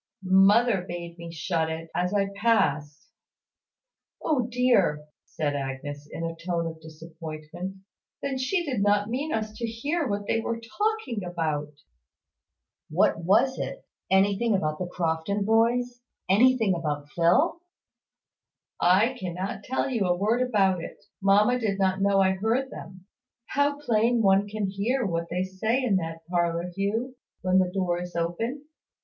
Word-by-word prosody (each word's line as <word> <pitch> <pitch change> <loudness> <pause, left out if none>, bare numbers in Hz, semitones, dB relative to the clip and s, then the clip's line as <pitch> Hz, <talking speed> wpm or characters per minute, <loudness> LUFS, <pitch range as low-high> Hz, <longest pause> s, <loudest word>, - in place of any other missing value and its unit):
"Mother 195 +3 +5
bade 170 0 -7
me 170 0 -7
shut 165 0 -1
it, 160 0 -6
as 180 +1 0
I 200 -1 +1
passed." 160 -9 +1 1.1
"O 260 -7 0
dear!" 235 -12 +2 0.2
said 145 -2 -2
Agnes, 145 +1 -5
in 165 - -5
a 165 0 -3
tone 170 0 -2
of 160 -1 -6
disappointment; 160 +2 -8 0.4
"then 270 -2 -3
she 345 +7 0
did 255 -9 -1
not 205 +1 +2
mean 285 +6 -2
us 215 -1 -2
to 235 - -2
hear 285 +8 -2
what 205 -1 -2
they 225 - +1
were 230 0 -3
talking 340 - -2
about." 160 -4 -2 1.2
"What - - +2
was 230 +9 +3
it? - - -5 0.2
Anything 200 +3 +3
about 155 -5 -1
the 180 - -2
Crofton 175 +3 -1
boys? 240 +3 +2 0.3
Anything 225 0 +4
about 150 -4 -3
Phil?" 180 - +2 1.2
"I 200 +9 +4
cannot 185 +1 -4
tell 260 - -1
you 230 -8 0
a 175 0 +2
word 220 +6 +1
about 195 -8 +2
it. - - -8 0.2
Mamma 210 +6 +4
did 210 -4 -1
not 190 -1 +1
know 200 0 +3
I 190 0 +4
heard 225 +8 0
them. 185 -1 -10 0.4
How 285 0 +1
plain 235 -4 +2
anyone 200 -3 +3
can 210 0 -2
hear 210 +7 -1
what 170 -2 -2
they 180 +2 -1
say 220 +7 -1
in 210 -6 +2
that 165 -2 -5
parlour, 175 0 0
Hugh, 225 +6 -2 0.3
when 185 0 +4
the 185 -1 +1
door 180 -2 -1
is 180 -1 -8
open! 225 - -2
195 Hz, 150 wpm, -26 LUFS, 170-230 Hz, 1.2 s, Mother